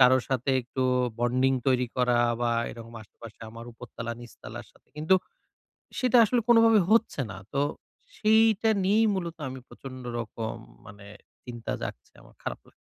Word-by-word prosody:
কারো 130 0 +7
সাথে 130 0 0
একটু 130 +2 -3 0.4
বন্ডিং 130 +2 +2
তৈরি 125 -1 +3
করা 125 -1 +3 0.2
বা 120 -1 +1 0.2
এরকম 115 0 -11
আশেপাশে 110 +1 -14
আমার 115 +1 -10
উপরতলা 115 0 -7
নিচতলার 120 -1 -10
সাথে - - -28
কিন্তু 155 +5 +3 0.8
সেটা 255 -2 +3
আসলে 240 +3 +2
কোনোভাবে 230 -2 +6
হচ্ছে 225 -8 +3
না। 95 - -7 0.2
তো 140 - 0 0.6
সেইটা 220 0 +4
নিয়েই 215 +3 +4
মূলত 170 -3 -4
আমি 130 0 -7
প্রচন্ড 130 -1 -10 0.2
রকম 115 -1 -4 0.3
মানে 100 0 -12 0.4
চিন্তা 120 -2 -5
জাগছে 60 - -7
আমার - - -19
খারাপ - - -5
লাগছে। - - -21
130 Hz, 150 wpm, -27 LUFS, -, 0.8 s, কারো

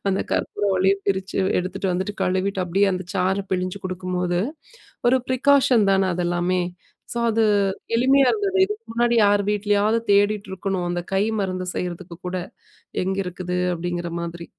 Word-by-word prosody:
அந்த 195 0 +1
கற்பூரவள்ளியையும் 195 -1 +1
பிரிச்சு 190 0 -1 0.2
எடுத்துட்டு 185 +2 -3
வந்துட்டு 190 +3 -2
கழுவிவிட்டு 190 +1 0
அப்படியே 185 +3 +2
அந்த 185 0 -2
சாறு 190 +1 +1
பிழிஞ்சு 185 +1 -1
குடுக்கும்போது, 180 -1 -2 0.7
ஒரு 255 - +5
ப்ரிகாஷன் 255 -4 +4
தானே 190 -1 +2
அதெல்லாமே. 175 +1 0 0.5
ஸோ 235 - -3
அது, 225 0 +2 0.5
எளிமையா 265 +3 +4
இருந்தது. 400 -3 0
இதுக்கு 420 +3 -6
முன்னாடி 240 +1 +2
யார் 205 0 +4
வீட்லயாவது 210 +1 +2
தேடிட்டுருக்கணும். 195 -2 0
அந்த 175 0 -1
கை 195 +2 +2 0.2
மருந்து 185 -1 -2
செய்றதுக்கு 175 -1 -5
கூட. 180 +1 -3 0.7
எங்கிருக்குது 185 -1 -3 0.2
அப்படிங்கிற 175 0 -3
மாதிரி. 170 0 -6
190 Hz, 130 wpm, -23 LUFS, 180-205 Hz, 0.7 s, ஒரு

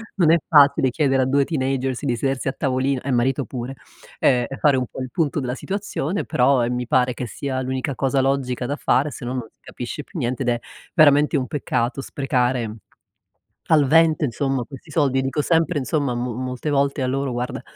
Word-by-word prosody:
non 170 -5 +4
è 170 - +6
facile 140 -3 +5
chiedere 135 -1 +2
a - - 0
2 140 +2 +3
teenagers 135 -3 -1
di 125 -3 +1
sedersi 135 +3 -2
a 135 - 0
tavolino 130 -1 0
e 135 - -3
marito 130 +3 +1
pure, 125 +2 -6 0.4
ehm 125 -2 +3
e 135 - -6
fare 145 -3 +4
un 130 - 0
po' 130 - -8
il 130 - -5
punto 155 -4 0
della 125 -1 -3
situazione, 200 -1 -3
però, 125 0 +3
ehm, 120 +1 -1
mi 125 -1 -3
pare 125 0 +2
che 125 +1 -5
sia 130 +3 -4
l'unica 130 +2 -2
cosa 135 +2 +1
logica 130 -2 -1
da 145 +4 -3
fare 145 0 +1
sennò 125 -1 -5
non 125 -3 -4
si - - -49
capisce 125 +4 -7
più 185 - -11
niente, 125 0 -1
ed 125 - 0
è 120 -1 0 0.3
veramente 150 -1 +5
un 130 -2 -2
peccato 125 -2 -2
sprecare 125 -5 -1 0.9
al 150 -3 +4
vento 160 +1 +4
insomma 135 0 -1
questi 135 +4 -12
soldi, 140 -3 +2
dico 135 +3 -1
sempre 165 0 +1
insomma 140 -2 -1
mo 120 0 -3
molte 130 +4 -4
volte 140 0 +1
a - - +1
loro: 135 0 -1
"Guarda, 120 +1 -3
135 Hz, 205 wpm, -22 LUFS, 125-145 Hz, 0.9 s, è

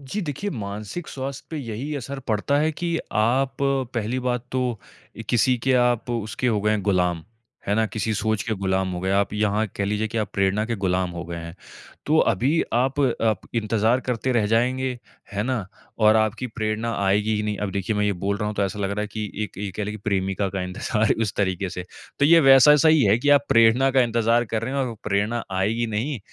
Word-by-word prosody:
जी, 140 +10 -4
देखिए 165 +6 -4
मानसिक 105 - -6
स्वास्थ्य 135 0 -6
पे 160 - -4
यही 130 +3 -5
असर 140 +1 -6
पड़ता 110 +6 +1
है 155 +2 +2
कि 170 +1 -2
आप 130 +5 +1
पहली 130 -3 -1
बात 125 -1 -1
तो 125 -4 -1 0.5
किसी 125 +2 +3
के 135 - +4 0.2
आप 120 0 -2
उसके 115 +1 -2
हो 110 -4 +2
गए 105 +1 +1
हैं 105 -2 0
गुलाम। 90 -4 +1 0.4
है 100 - +1
ना? 110 +1 +2
किसी 110 +1 -2
सोच 110 0 0
के 115 - -2
गुलाम 95 -1 -1
हो 90 - -4
गए, 95 +1 -1
आप 100 +1 +1
यहाँ 105 +1 +1
कह 100 - -1
लीजिए 105 +2 -1
कि 115 +1 -3
आप 105 - -2
प्रेरणा 100 +1 +1
के 115 - -2
गुलाम 90 0 +1
हो 85 0 -6
गए 85 0 -6
हैं, 85 0 -7 0.5
तो 155 +2 +3
अभी 135 - +1
आप, 130 +4 +1 0.2
आप 110 -2 +1
इंतजार 115 +2 +1
करते 125 0 -2
रह 115 -4 +2
जाएँगे, 125 +3 0 0.3
है 100 +1 -1
ना? 120 -4 -2 0.3
और 110 -1 +5
आपकी 110 +3 0
प्रेरणा 110 +1 -1
आएगी 105 +3 +2
ही 105 - -1
नहीं। 105 -1 -2
अब - - -4
देखिए 100 +2 -2
मैं 105 - +1
ये 105 - +2
बोल 100 0 +1
रहा 105 - -3
हूँ 105 - -4
तो 100 - +1
ऐसा 100 +2 -4
लग 100 -1 -1
रहा 100 +1 -2
है 105 - -2
कि 105 -2 -4
एक 105 - -11
ये 100 0 -3
कह 105 - -2
लें 105 - -4
कि - - -7
प्रेमिका 95 0 0
का 95 -1 -3
इंतजार 105 +4 0
उस 105 - -2
तरीके 95 -1 0
से। 90 - -6 0.3
तो 145 - +3
ये 165 +3 +7
वैसा-सा 145 +2 +7
ही 155 -2 +5
है 105 +3 +4
कि 145 - -1
आप 140 - -16
प्रेरणा 115 +4 +5
का 135 0 +3
इंतजार 115 0 +2
कर 110 - 0
रहे 130 +3 -3
हैं 140 - 0
और 120 - -5
प्रेरणा 105 +3 0
आएगी 110 +5 0
नहीं 115 +6 -2
110 Hz, 225 wpm, -23 LUFS, 100-130 Hz, 0.5 s, ये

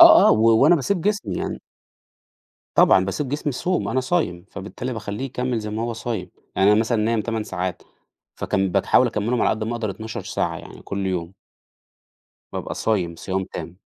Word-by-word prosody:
آه، - - +10
آه - - +7
و 110 +1 +5
وأنا 165 +5 +7
باسيب 175 +6 0
جسمي 195 - -1
يعني - - -3 1.1
طبعًا 95 - +6
باسيب 110 +9 -2
جسمي 145 +2 -2
يصوم، 180 +7 -1
أنا 130 - +1
صايم 125 - -1
فبالتالي 115 +6 -5
باخلّيه 105 +2 -4
يكمل 125 -2 -2
زي 105 -1 -5
ما 110 +2 -2
هو 115 0 -1
صايم، 115 -5 -4 0.3
يعني 100 +2 +5
أنا 105 - +4
مثلًا 115 -1 +1
نايم 115 0 +1
8 110 0 -2
ساعات 90 -3 -3 0.5
فكا 95 0 0
بتحاول - - +4
أكملهم 115 +3 0
على - - +4
قد 110 0 -1
ما 115 - -2
أقدر 115 -3 -2
12 110 +2 -6
ساعة - - -2
يعني - - -12
كل 100 -1 -3
يوم. 90 -2 -2 1.2
بابقى - - -4
صايم 90 -7 0
صيام 95 +2 -2
تام. 90 - -8
110 Hz, 180 wpm, -23 LUFS, 95-125 Hz, 1.2 s, آه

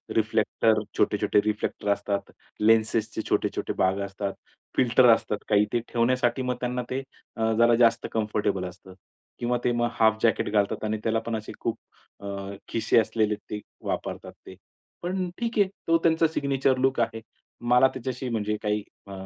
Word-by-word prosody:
Reflector 110 0 +2 0.2
छोटे-छोटे - - +2
reflector 105 -1 -2
असतात, 100 0 -2 0.3
लेन्सेसचे 110 0 +2
छोटे-छोटे - - 0
भाग 95 +1 +2
असतात, 100 0 -4 0.4
फिल्टर 125 0 +5
असतात 105 -2 -1
काही 105 -1 +4
ते 120 - +3
ठेवण्यासाठी 120 +1 +2
मग 125 -1 -1
त्यांना 125 0 -2
ते 130 +1 -2 0.3
अ, 110 -1 +1
जरा 120 0 +6
जास्त 115 0 +3
कम्फर्टेबल 105 -3 -1
असतं. 90 +1 -10 0.5
किंवा 120 +1 0
ते 120 - +2
मग 120 0 +1
हाल्फ 110 -1 +5
जॅकेट 115 -3 +2
घालतात 105 -1 +1
आणि 110 0 -1
त्याला 115 0 +1
पण 115 - -1
असे 110 0 -6
खूप 115 -1 -2 0.4
अ, - - -11 0.4
खिसे 115 0 +2
असलेले 110 0 +1
ते 105 0 -7 0.3
वापरतात - - -4
ते. - - -11 0.5
पण 180 +1 -2
ठीक 235 -1 -3
आहे, 200 - +5 0.2
तो 165 - +5
त्यांचा 165 0 +4
सिग्नेचर 135 -3 +1
लूक 130 0 +1
आहे. 115 -1 -1 0.5
मला 125 +2 +6
त्याच्याशी 130 0 -4
म्हणजे 105 -2 -1
काही 105 0 0 0.2
अ, - - -10
115 Hz, 160 wpm, -26 LUFS, 105-125 Hz, 0.5 s, जरा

